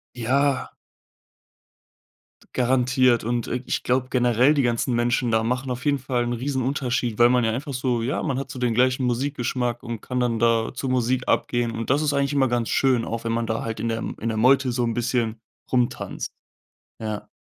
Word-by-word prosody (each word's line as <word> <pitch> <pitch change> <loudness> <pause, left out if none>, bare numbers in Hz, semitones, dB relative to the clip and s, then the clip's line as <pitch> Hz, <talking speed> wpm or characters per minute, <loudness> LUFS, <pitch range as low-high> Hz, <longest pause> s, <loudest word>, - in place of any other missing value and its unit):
Ja. 130 +3 +1 1.8
Garantiert. 125 -1 +3
Und, 120 +1 -1
äh, 125 +1 -3
ich - - -2
glaube 130 +1 +1
generell, 125 +3 +3
die 145 - +2
ganzen 120 +1 0
Menschen 120 +1 +1
da 110 0 +2
machen 130 +3 -1
auf 125 +2 -4
jeden 145 -1 +2
Fall 125 -2 -1
'n 120 - -2
Riesenunterschied, 125 -2 -1
weil 120 0 +7
man 125 -1 +3
ja 110 - +1
einfach 140 +5 -4
so 125 -2 0
ja, 125 +5 -1
man 135 -5 -1
hat 135 - -7
so 130 - -7
den 125 -2 0
gleichen 130 +2 +2
Musikgeschmack 125 -1 -1
und 115 -3 -5
kann 125 - -4
dann 120 -2 0
da 115 -1 +2
zur 130 0 -3
Musik 125 0 0
abgehen. 120 -1 +1
Und 115 +1 -5
das 140 +3 +3
ist 150 -1 +1
eigentlich 140 0 +1
immer 135 -2 +2
ganz 120 -1 -1
schön, 130 -4 +2
auch 115 0 -4
wenn 115 - -3
man 115 0 -1
da 110 +1 -2
halt 110 -1 -4
in 115 +2 -2
der 115 0 -1
M - - -5
in 115 - -2
der 110 - -1
Meute 130 +3 +4
so 125 +1 -1
'n 115 -1 0
bisschen 120 -1 0 0.3
rumtanzt. 125 -2 -1 0.7
Ja. 110 -2 -5
125 Hz, 205 wpm, -24 LUFS, 115-130 Hz, 1.8 s, weil